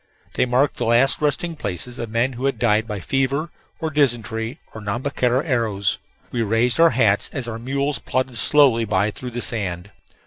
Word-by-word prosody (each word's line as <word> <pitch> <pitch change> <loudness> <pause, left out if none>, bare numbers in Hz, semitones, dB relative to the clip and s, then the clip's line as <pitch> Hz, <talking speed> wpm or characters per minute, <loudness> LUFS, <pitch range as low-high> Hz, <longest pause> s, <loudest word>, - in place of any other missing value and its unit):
They - - +1
marked 130 +4 +2
the - - -1
last 120 +6 +3
resting 155 +3 0
places 120 - -5
of 115 - -4
men 115 +4 0
who 125 +2 -4
had 135 - 0
died 110 -1 +2
by 105 -3 -4
fever, 135 - -1 0.3
or 160 -1 -2
dysentery, 120 -3 0
or 110 - -8
Nhambiquara 125 +4 0
arrows. 115 - 0 0.3
We 120 - -1
raised 115 +5 +1
our 165 0 +7
hats 110 -8 +2
as 130 -4 -4
our 115 -1 -5
mules 140 +2 -1
plodded 130 -2 -2
slowly 135 -6 +4
by 105 -1 +1
through 125 +4 -7
the 120 0 -5
sand. 95 -4 -3
120 Hz, 180 wpm, -22 LUFS, 110-135 Hz, 0.3 s, our